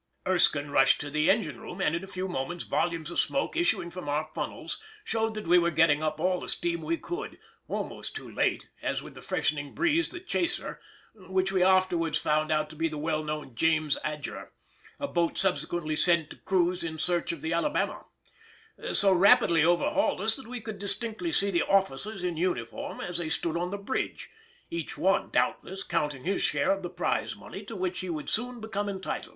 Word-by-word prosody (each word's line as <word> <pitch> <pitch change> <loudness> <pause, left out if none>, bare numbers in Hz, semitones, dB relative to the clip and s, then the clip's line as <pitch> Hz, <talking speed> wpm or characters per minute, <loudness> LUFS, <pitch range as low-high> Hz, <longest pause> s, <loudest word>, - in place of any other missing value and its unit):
Erskine 150 -6 +3
rushed 135 - +5
to 145 -1 -5
the 150 +3 +2
engine 215 +3 +1
room, 180 - -8
and 175 - +2
in 170 - -3
a - - -7
few 190 -1 -3
moments 175 +1 -3
volumes 165 -1 -1
of - - 0
smoke 280 +4 0
issuing 345 - +1
from 175 -4 -6
our 150 +2 0
funnels - - -4 0.2
showed 225 - -1
that 215 - -5
we 175 +2 +6
were 170 0 +2
getting 160 -2 +4
up 155 0 -1
all 180 +2 +2
the - - -3
steam 170 -1 0
we 165 +2 -1
could—almost 360 - -6
too - - -6
late, - - 0 0.2
as - - -1
with - - -10
the - - -11
freshening 145 -2 -1
breeze 340 0 +2
the 350 - -5
chaser 350 -1 -1 0.3
(which 190 -1 -1
we 190 -1 +2
afterwards 185 -3 +3
found 155 +1 +1
out 155 0 +2
to 155 - -12
be 165 +2 +1
the 155 -1 -5
well 155 0 -1
known 150 -4 -4
James 155 +3 +2
Adger, 150 -1 -4 0.5
a 280 - -1
boat 170 -8 0
subsequently 175 -4 +2
sent 170 -1 +3
to - - -7
cruise 180 -1 +1
in 160 -1 -4
search 175 +2 +1
of 165 -3 -7
the 160 +1 -1
Alabama) 170 - 0 0.9
so 195 -1 +5
rapidly 175 -3 +6
overhauled 175 +2 +2
us 220 +2 +2
that 265 - -9
we 245 +1 -5
could 215 -3 -7
distinctly 225 - -2
see 200 -7 +2
the 170 -3 +2
officers 195 +1 +1
in 175 -3 -1
uniform 185 - -2
as 175 -1 -2
they 165 -2 -2
stood 160 0 -1
on 175 +1 -1
the 200 - -3
bridge; 200 +6 -3 0.4
each 165 -3 -4
one, 190 +6 +2
doubtless, 190 +1 0
counting 150 -6 -1
his 195 +2 0
share 145 +6 +2
of 195 0 0
the 175 - -4
prize 180 0 -1
money 195 - -9
to 220 +3 -8
which 185 -1 -2
he 185 - -4
would 155 -3 -3
soon 245 +2 -2
become 205 -2 -2
entitled. 190 -1 -4
175 Hz, 200 wpm, -29 LUFS, 160-195 Hz, 0.9 s, we